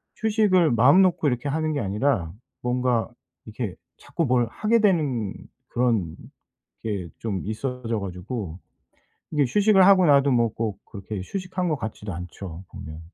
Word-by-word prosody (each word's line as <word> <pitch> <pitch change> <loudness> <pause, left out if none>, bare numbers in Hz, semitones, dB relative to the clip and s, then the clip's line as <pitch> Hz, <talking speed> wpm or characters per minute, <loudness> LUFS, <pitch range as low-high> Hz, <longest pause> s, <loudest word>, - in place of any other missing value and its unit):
휴식을 210 -6 +3
마음 125 +10 +6
놓고 180 -5 +2
이렇게 125 +1 -1
하는 155 +2 -1
게 145 - -1
아니라 100 - 0 0.3
뭔가 125 -2 0 0.3
이렇게 110 -3 -5 0.2
자꾸 165 - -3
뭘 125 -4 +2
하게 220 - +1
되는 145 - +1 0.3
그런 115 -10 0 0.7
게 100 -6 -3
좀 100 -5 -3
있어져 115 +1 -3
가지고 95 -1 -5 0.8
이게 145 -1 +3
휴식을 205 - +5
하고 190 -2 +6
나도 140 -1 +5
뭐 120 -3 +3
꼭 110 -4 -3
그렇게 100 +1 -8
휴식한 185 - -3
것 155 - +1
같지도 110 -4 -6
않죠 90 0 -8
보면. 80 +1 -9
125 Hz, 290 characters per minute, -24 LUFS, 105-155 Hz, 0.8 s, 마음